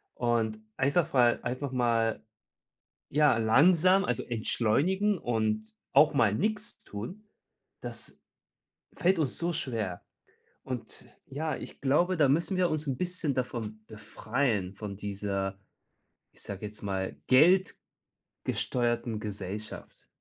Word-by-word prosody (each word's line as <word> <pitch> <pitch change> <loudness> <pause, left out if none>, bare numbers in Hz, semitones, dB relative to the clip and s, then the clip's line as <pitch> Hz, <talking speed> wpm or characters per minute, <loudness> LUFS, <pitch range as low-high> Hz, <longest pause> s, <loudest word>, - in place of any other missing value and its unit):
und 115 -3 0 0.2
einfach 140 +5 +2
mal 120 -2 +4
einfach 130 +3 -3
mal, 115 -3 +1 0.9
ja, 145 -4 +4
langsam, 175 - +5
also 125 - -1
entschleunigen 160 - +1
und 110 -2 -1 0.2
auch 145 +2 +6
mal 110 -6 +3
nix 215 - -2
tun, 145 - -8 0.6
das - - -7 0.7
fällt 180 0 +3
uns 140 -5 0
so 170 +1 0
schwer. 115 - -3 0.6
Und 130 -2 -7 0.2
ja, 155 +3 -3
ich - - -10
glaube, 175 +7 +2
da 145 -3 +5
müssen 170 +6 +1
wir 180 -1 +3
uns 155 -1 -2
'n 135 -2 -1
bisschen 180 -6 -1
davon 115 -4 -4
befreien, 110 -1 -2
von 100 -1 -6
dieser, 100 -1 -3 0.7
ich - - -14
sage 100 +1 -6
jetzt 105 - -12
mal, 95 -5 -2 1.1
geldgesteuerten 120 -3 -2
Gesellschaft. 105 0 -7
120 Hz, 115 wpm, -29 LUFS, 110-155 Hz, 1.1 s, auch